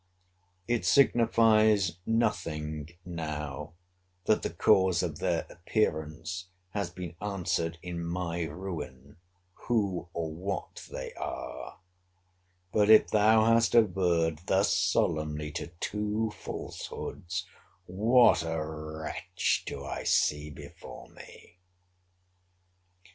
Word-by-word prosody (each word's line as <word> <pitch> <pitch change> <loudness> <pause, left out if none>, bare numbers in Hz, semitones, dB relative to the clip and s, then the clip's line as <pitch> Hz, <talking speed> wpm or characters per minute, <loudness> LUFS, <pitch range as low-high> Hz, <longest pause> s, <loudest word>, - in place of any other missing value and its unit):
It 120 -1 0
signifies 110 - +4
nothing 80 -10 -1 0.2
now, 75 -5 -5 0.5
that 110 - +3
the - - -2
cause 95 -1 +3
of 80 -4 -3
their 85 -3 0
appearance 85 -2 -2 0.2
has 100 -3 -2
been 85 -1 -7
answered 90 -5 -1
in 85 -1 -4
my 85 0 -2
ruin, 80 -5 -7 0.4
who 100 -8 -1
or 80 -2 -3
what 95 +4 -5
they 65 - -6
are: - - -6 0.9
but 105 -1 +3
if 110 - +7
thou 110 +1 +5
hast 115 +1 +4
averred 85 -7 +3
thus 95 +2 +3
solemnly 75 -5 0
to - - -4
two 105 +1 -1
falsehoods, 90 +1 -6 0.4
what 110 +3 +5
a 80 -1 -2
wretch 80 +3 -2
do - - -5
I - - -4
see 75 +1 +2
before 75 - -11
me! 90 - -15
90 Hz, 100 wpm, -29 LUFS, 80-105 Hz, 0.9 s, if